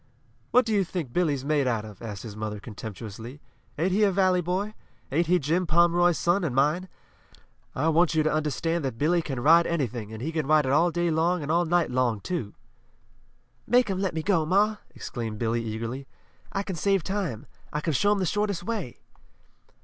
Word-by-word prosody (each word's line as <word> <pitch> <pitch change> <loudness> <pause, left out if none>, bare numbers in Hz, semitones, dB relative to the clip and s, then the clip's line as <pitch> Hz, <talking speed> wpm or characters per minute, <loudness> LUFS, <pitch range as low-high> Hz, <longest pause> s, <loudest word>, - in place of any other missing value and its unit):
"What 250 - +4
do 225 - -1
you 200 -2 +3
think 170 -8 -5
Billy's 145 -7 0
made 145 -2 +1
out 115 -3 0
of?" 105 -3 -12
asked 105 -4 -6
his 110 -3 -8
mother 105 -1 -4
contemptuously. 110 +4 -8 0.4
"Ain't 175 +5 +1
he 200 +4 +2
a 205 - +5
valley 185 -1 +3
boy? 185 +5 -2 0.4
Ain't 165 +4 +1
he 180 +2 +4
Jim 170 +4 0
Pomeroy's 175 +1 +4
son 175 +3 +1
and 140 -7 -2
mine? 155 +7 +1 0.9
I 150 +5 0
want 165 +1 +3
you 155 - +3
to 155 - +1
understand 155 +2 -1
that 130 -4 -3
Billy 170 +6 +2
can 135 -6 -4
ride 165 +5 +6
anything, 120 -9 -2
and 110 - -7
he 150 +8 -3
can 155 -4 -2
ride 155 -1 +4
it 130 - 0
all 165 +5 +4
day 175 0 0
long 165 +1 +1
and 145 - -2
all 170 +1 +3
night 170 -3 +1
long, 125 -4 +1
too!" 130 - -4 1.1
"Make 245 -3 +3
'em 190 - -2
let 190 -4 -1
me 160 - -2
go, 185 -4 +2
ma!" 205 +6 +2 0.2
exclaimed 115 -3 -5
Billy, 115 +1 0
eagerly. 115 +5 -5 0.4
"I 195 - -2
can 190 -2 -4
save 195 +2 +1
time. 185 - -3 0.3
I 150 - -2
can 155 +1 -1
show 205 +10 +2
'em 210 - +3
the 190 - 0
shortest 205 -1 -1
way!" 200 - -4
160 Hz, 205 wpm, -26 LUFS, 130-180 Hz, 1.1 s, ride